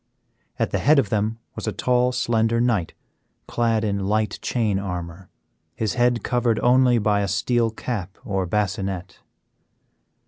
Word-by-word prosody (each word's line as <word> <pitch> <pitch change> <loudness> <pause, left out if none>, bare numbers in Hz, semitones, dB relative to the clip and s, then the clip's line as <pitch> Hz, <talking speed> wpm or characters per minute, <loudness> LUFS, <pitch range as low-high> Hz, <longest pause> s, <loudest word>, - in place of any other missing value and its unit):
At - - -1
the - - 0
head 150 +2 +4
of 125 -8 +2
them 110 +2 0 0.2
was - - -6
a - - +1
tall, 125 0 +1
slender 115 -2 +1
knight 115 -8 0 0.5
clad 115 -2 0
in 100 -2 -1
light 110 +1 0
chain 110 -5 0
armor, 90 -1 -6 0.5
his 110 -2 -1
head 120 -1 +1
covered 120 -2 +1
only 125 0 +4
by 105 -2 +2
a 100 - 0
steel 115 +5 +1
cap 105 -4 -5
or 95 -2 -1
bascinet. 95 -2 -2
110 Hz, 145 wpm, -23 LUFS, 100-120 Hz, 0.5 s, head